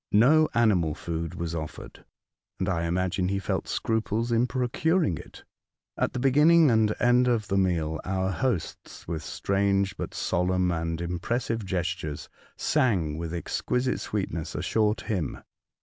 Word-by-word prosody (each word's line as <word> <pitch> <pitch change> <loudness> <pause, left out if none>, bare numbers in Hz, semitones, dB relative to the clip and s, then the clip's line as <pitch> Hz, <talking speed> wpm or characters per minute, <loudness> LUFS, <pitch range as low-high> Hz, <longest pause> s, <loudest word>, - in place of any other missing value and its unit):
No 150 +9 +5
animal 95 -10 +3
food 85 -1 -4
was 85 -1 -4
offered, 80 -2 -7 0.5
and 95 - -2
I 85 -3 0
imagine 90 +2 0
he 100 +1 0
felt 100 - -2
scruples 110 +1 -1
in 120 +2 +3
procuring 125 - 0
it. - - -13 0.5
At - - -1
the 130 - -2
beginning 150 +3 +5
and 110 -2 +3
end 125 +1 +4
of 115 -4 0
the 100 - +1
meal 80 -4 0
our 95 0 -1
hosts, 105 -5 -3
with 80 -2 -3
strange 100 -1 0
but - - -5
solemn 90 0 +1
and 80 -1 -2
impressive 110 +7 -2
gestures, 90 -5 -3 0.3
sang 95 - +1
with 85 -1 -4
exquisite 125 +8 -1
sweetness 95 -6 -3
a - - -3
short 110 -1 +1
hymn. 95 -8 -2
95 Hz, 145 wpm, -27 LUFS, 85-120 Hz, 0.5 s, No